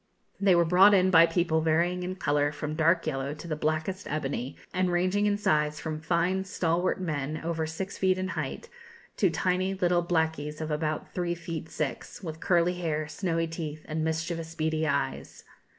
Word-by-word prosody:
They 195 -2 +5
were 170 0 +4
brought 190 +4 +7
in 185 0 +4
by 165 -1 +8
people 165 -1 +1
varying 170 +3 +1
in 180 +1 -3
colour 145 -4 +1
from 150 0 -4
dark 165 +2 +2
yellow 135 +2 -2
to 160 - -9
the 155 - -2
blackest 155 +6 -2
ebony, 140 -3 -3 0.2
and 185 0 +1
ranging 185 +4 +2
in 205 0 +2
size 150 -6 +1
from 155 -1 -4
fine 175 +4 +1
stalwart 175 -1 0
men, 155 -4 -2
over 165 -1 -1
six 190 +5 -5
feet 185 -1 +3
in 185 0 -2
height, - - -4 0.5
to 190 - +4
tiny 185 +3 0
little 175 -2 +2
blackies 160 -3 -1
of 155 -1 -3
about 155 0 -2
three 175 -1 -1
feet 165 -2 -6
six, 155 +6 -4
with 160 -2 -6
curly 175 0 +2
hair, 155 -3 -1
snowy 165 +1 -1
teeth, 155 -2 -6
and 155 0 -2
mischievous, 165 +1 -3
beady 160 0 0
eyes. 140 -2 -2
165 Hz, 180 wpm, -28 LUFS, 155-180 Hz, 0.5 s, by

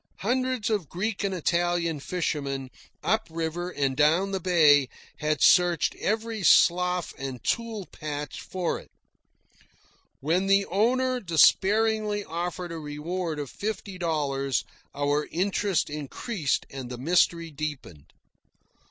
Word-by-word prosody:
Hundreds 255 0 0
of 200 -9 -1
Greek 200 +4 -2
and 200 - 0
Italian 175 -2 0
fishermen, 140 -5 -3 0.3
up 220 0 +1
river 165 +2 -3
and 135 -6 -1
down 160 +7 +3
bay, 155 -7 +5 0.3
had 150 -2 0
searched 175 -2 +4
every 220 +1 -2
slough 180 0 +4
and 135 -3 -6
tule 230 -4 -2
patch 150 -2 -6
for 180 -2 -2
it. - - -16 1.3
When 175 +7 +1
the 195 0 +4
owner 255 +6 +1
despairingly 210 - +3
offered 175 +2 -4
a 165 - -5
reward 155 +3 -4
of 145 -3 -5
fifty 200 -3 -5
dollars, 140 -5 0 0.3
our 145 +1 0
interest 195 +1 0
increased 150 - -2
and 130 -3 -7
the 125 - -6
mystery 170 +3 +2
deepened. 145 - -6
175 Hz, 115 wpm, -26 LUFS, 150-195 Hz, 1.3 s, bay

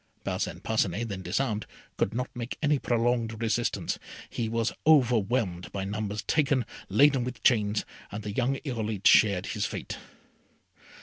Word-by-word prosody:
Parcin - - -2
Parcinet, 110 0 0
then 95 -2 -4
disarmed, 105 +4 -1 0.3
could - - 0
not 125 +3 -4
make 120 0 -5
any 150 -1 +3
prolonged 115 -2 0
resistance. 115 +1 -1 0.3
He 115 -2 -2
was 115 0 0
overwhelmed 115 - +3
by 100 - -3
numbers, 105 +1 -3
taken, 140 -5 +2 0.2
laden 140 -3 +5
with 125 -1 -6
chains, 105 -3 +3 0.3
and 105 +1 -5
the 105 - -4
young 130 +5 +1
Irolite 110 -6 -3
shared 100 -4 +6
his - - -1
fate. - - -6
115 Hz, 140 wpm, -28 LUFS, 105-125 Hz, 0.3 s, shared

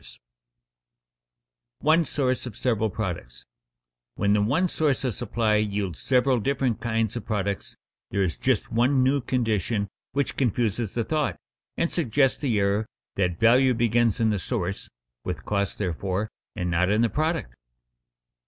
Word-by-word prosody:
[Sidenote: - - -12 1.6
One 160 +2 +4
source 130 -3 -1
of 110 - -8
several 110 -4 +1
products] 90 - -5 0.7
When 100 0 +2
the 105 - +3
one 145 - +2
source 150 -6 0
of 125 -4 0
supply 110 -1 0
yields 100 -5 -1
several 130 -1 +3
different 130 -1 0
kinds 115 -1 0
of 120 - -4
products 100 -3 -2 0.3
there 100 0 +1
is 90 -4 -1
just 130 -5 0
one 130 +4 +3
new 135 +2 +2
condition 110 -4 0 0.2
which 140 0 -1
confuses 115 -3 0
the 115 - +1
thought 145 - -1 0.4
and 170 - 0
suggests 135 -4 +2
the 120 -8 +1
error 100 +2 +1 0.3
that 90 -3 0
value 125 +3 +5
begins 115 -1 +2
in 110 -1 +3
the 105 - 0
source 90 +2 -3 0.3
(with - - -5
costs 100 -1 0
therefore) 95 +3 -2 0.2
and 90 -4 -2
not 90 +2 +2
in 105 +3 +3
the - - +4
product. 155 - -1
110 Hz, 150 wpm, -25 LUFS, 100-130 Hz, 1.6 s, value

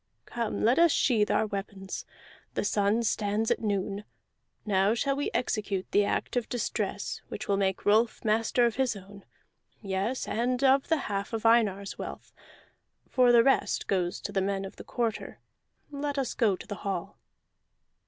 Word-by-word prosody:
"Come, 235 -2 -3
let 240 +7 +4
us 340 -1 +6
sheathe 220 -8 +2
our - - +2
weapons. 195 -2 -6 0.5
The - - 0
sun 205 +2 +1
stands 215 0 0
at - - +1
noon; 200 -1 -1 0.6
now 200 +1 +2
shall 275 +4 0
we 285 - -1
execute 205 -6 -1
the 205 0 +4
act - - -2
of 245 -2 -1
distress 210 -4 -3
which 215 - -6
will 200 - +2
make 195 -1 -1
Rolf 220 +3 +2
master 225 +3 +2
of 235 0 0
his 260 -4 +1
own 200 0 -12 0.5
yes, 200 +5 -2
and 245 +3 0
of 270 0 +4
the 325 - +3
half 200 +1 -3
of 225 0 -3
Einar's 205 -4 +2
wealth, - - -7 0.8
for 250 -2 +5
the 235 -1 +7
rest 270 - +2
goes 180 -3 0
to - - -5
the 195 -1 0
men 195 0 -1
of 195 - -10
the - - -9
Quarter. 230 -3 -3 0.5
Let 285 0 -3
us 265 -3 -1
go 215 -5 +2
to - - -11
the 205 - -5
hall." 195 -1 -4
215 Hz, 170 wpm, -28 LUFS, 200-240 Hz, 0.8 s, the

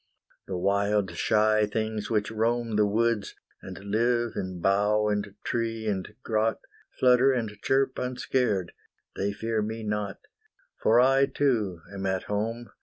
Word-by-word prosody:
The 95 - -3
wild 100 +1 +1
shy 110 0 +2
things 110 0 -3
which 105 -2 0
roam 115 0 0
The 105 0 +4
woods, 115 0 0 0.3
and 95 -1 -8
live 115 +4 0
in 95 -1 -4
bough 105 +3 +2
and 105 -1 -2
tree 115 -1 -2
and 100 0 -3
grot, 110 -1 0 0.4
Flutter 125 +1 +5
and 120 -4 -1
chirp 135 0 +1
unscared, 125 -7 -1 0.4
they 100 +1 -1
fear 110 +1 -2
me 110 +1 -4
not, 105 -2 -3 0.6
For 115 +2 +5
I 135 +2 +5
too 110 -13 0
am 95 -1 -3
at 95 -1 -1
home. 115 +3 -3
110 Hz, 140 wpm, -27 LUFS, 100-115 Hz, 0.6 s, Flutter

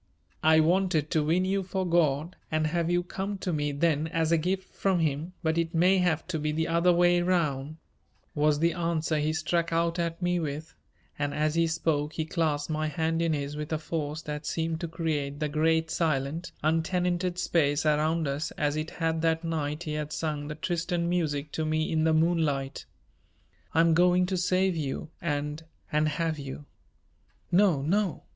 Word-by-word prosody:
"I 160 0 +5
wanted 170 -2 +2
to 155 -3 +2
win 170 +5 +2
you 195 +1 +1
for 190 0 -2
God 165 -1 +1
and 155 0 +1
have 170 +1 0
you 175 0 +2
come 195 +3 -4
to 185 -2 -3
me 145 -1 0
then 155 +1 +1
as 160 0 0
a 165 - +5
gift 185 +3 -2
from 195 -2 +1
Him, 160 +1 -1
but 160 +1 +1
it 165 +1 -2
may 185 +3 +4
have 170 -4 +1
to 160 -4 -1
be 150 0 -1
the 160 +1 -1
other 170 +2 +3
way 175 0 +4
round," 155 -5 0 0.6
was 150 0 +2
the 165 +2 +2
answer 165 -2 0
he 150 +1 +1
struck 165 +2 0
out 165 +1 +1
at 170 -1 -2
me 175 -1 +1
with, 155 +1 -4 0.5
and 145 0 -1
as 155 0 +1
he 165 0 +2
spoke 160 -2 0
he 160 - -2
clasped 155 -2 -1
my 155 0 -1
hand 160 +2 -1
in 165 -1 +1
his 145 0 -3
with 150 +1 -5
a 155 - +1
force 155 0 -4
that 150 0 -5
seemed 165 0 -1
to 170 - -3
create 150 -4 -2
the 150 - 0
great 160 +2 +1
silent, 155 +1 -1
untenanted 175 +3 0
space 145 -4 +1
around 155 +1 +2
us 140 +3 -2
as 145 -1 0
it 155 +1 -3
had 165 -1 -1
that 165 0 +1
night 155 -1 -2
he 155 -3 -4
had 150 0 -3
sung 150 -2 -3
the 150 - -5
Tristan 175 +1 -1
music 150 -4 -1
to 160 - -2
me 155 0 0
in 160 -1 +2
the 160 - +3
moonlight. 155 -4 0 0.9
"I'm 165 0 +5
going 180 +2 +4
to 185 +1 -2
save 185 +1 +2
you 155 +1 -4
and 150 -2 -2 0.3
and 150 +1 +2
have 160 0 -1
you." 140 +1 -7 0.9
"No, 175 -7 +4
no!" 190 +3 0
160 Hz, 190 wpm, -28 LUFS, 150-170 Hz, 0.9 s, I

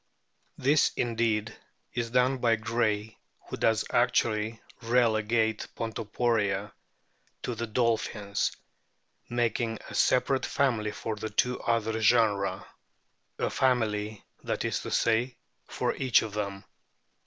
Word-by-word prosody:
This 145 +4 +3
indeed 115 -3 0 0.4
is 120 -1 -2
done 125 +2 +2
by 115 -2 +3
Gray, 110 -1 -1 0.3
who - - -4
does 110 -1 +2
actually 115 -2 +1 0.2
relegate 115 -2 +2
Pontoporia 115 -2 -1 0.7
to 125 - -2
the 115 +1 -4
dolphins, 105 -3 0 0.8
making 120 -1 0
a - - -9
separate 130 +1 +2
family 120 -6 +1
for 110 +1 -4
the 110 +1 -4
two 125 +4 0
other 110 -1 0
genera 110 -3 +2 0.7
a - - -1
family, 110 -5 0 0.2
that - - -2
is - - 0
to - - -6
say, 120 +3 +1 0.3
for - - -1
each 130 -3 +3
of 110 -3 -6
them. 100 -2 -3
115 Hz, 115 wpm, -28 LUFS, 105-120 Hz, 0.8 s, This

